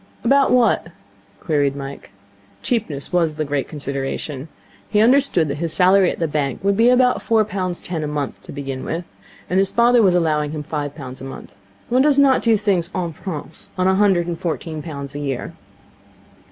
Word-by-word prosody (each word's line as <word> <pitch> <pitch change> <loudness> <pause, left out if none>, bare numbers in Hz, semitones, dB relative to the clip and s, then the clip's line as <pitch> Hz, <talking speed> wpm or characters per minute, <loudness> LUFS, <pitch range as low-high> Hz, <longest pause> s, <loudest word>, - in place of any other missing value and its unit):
'About 275 0 +4
what?' 235 -8 +3 0.5
queried 145 -3 0
Mike. 140 0 -8 0.5
Cheapness 175 - -2
was 165 -3 +2
the 155 0 -2
great 145 -1 -2
consideration. 140 0 -5 0.4
He 210 - +2
understood 240 - +4
that 140 0 -4
his 165 -1 -2
salary 185 0 +5
at - - -4
the 165 - 0
bank 145 0 -2
would 200 0 +2
be 230 +4 +5
about 250 0 +3
four 220 -2 +2
pounds 185 -4 -3
ten 165 -3 -4
a - - -2
month, 145 -2 -4
to - - -9
begin 135 -2 -5
with, 170 +2 -4 0.4
and 185 - +1
his 195 0 +2
father 235 +1 +4
was 185 -4 +4
allowing 155 -3 +1
him 150 -1 -4
five 145 -1 -4
pounds 130 -4 -9
a - - -6
month. 135 - -9 0.4
One 255 +2 +3
does 285 0 +4
not 275 -2 +5
do 225 -2 +3
things 195 -5 0
en 170 -3 -2
prince 160 -2 -7
on 185 - +1
a 190 - +4
hundred 190 -3 +3
and 170 -1 -4
fourteen 160 -2 -4
pounds 140 -3 -7
a 145 - -5
year. 135 -3 -4
170 Hz, 195 wpm, -20 LUFS, 145-205 Hz, 0.5 s, salary